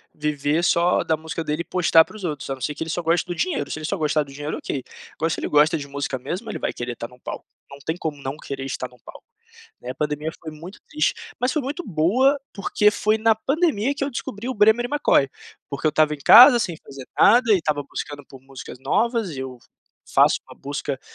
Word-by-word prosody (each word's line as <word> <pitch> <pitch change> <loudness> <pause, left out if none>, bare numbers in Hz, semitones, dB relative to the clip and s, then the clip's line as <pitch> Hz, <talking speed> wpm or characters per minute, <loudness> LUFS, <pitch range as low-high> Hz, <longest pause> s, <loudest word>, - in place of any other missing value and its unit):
viver 150 +2 -1
só 175 0 +3
da 160 - +1
música 160 +1 -5
dele 150 +1 -2
e - - -6
postar 165 -2 +4
para - - -15
os 215 - -10
outros, 150 -6 -4
a - - 0
não 130 - -17
ser 150 - -2
que - - -13
ele 160 - -3
só 175 - -2
gosta 165 0 +1
do 175 - -2
dinheiro, 350 - -1
se - - -4
ele 155 - -6
só 195 +5 -2
gostar 155 -1 +1
do 140 -1 -14
dinheiro 145 +2 -4
ok, 135 - -4 0.3
agora 165 - -1
se - - -2
ele - - -3
gosta 150 +3 +4
de 140 -2 -7
música 140 -1 -3
mesmo 185 - -5
ele 215 - -4
vai - - -3
querer 120 0 -4
estar 115 0 -7
num 125 +1 -19
palco, - - -7 0.2
não 140 - -11
tem 160 - -1
como 160 -4 -4
não 135 +1 -3
querer 135 -2 -6
estar 130 -1 -4
num 125 - -20
palco, - - -12 0.6
né. 125 - -7
A - - -21
pandemia 150 +2 -2
foi 160 - -8
muito 165 +6 -11
triste, 305 +1 +1 0.3
mas 250 +1 +1
foi 305 - -1
muito 285 +7 -4
boa, 215 - +2
porque 210 +1 +2
foi 215 +1 +1
na 220 0 +3
pandemia 275 - 0
que 280 - -2
eu 280 - -3
descobri 235 -2 -5
o 260 - -2
Bremer/McCoy. 225 - +3 0.4
Porque 140 +2 -3
eu - - +4
estava 155 0 +2
em - - -10
casa 240 - +9
sem 175 -7 -2
fazer 135 -2 -10
nada, 235 +1 +6
e - - +3
estava 150 -3 -1
buscando 145 -1 -6
por 135 - -13
músicas 130 -2 -10
novas, 230 - 0
eu 130 -1 -6 0.5
faço - - +4
uma - - -13
busca, 140 -1 -5
160 Hz, 240 wpm, -23 LUFS, 145-215 Hz, 0.6 s, casa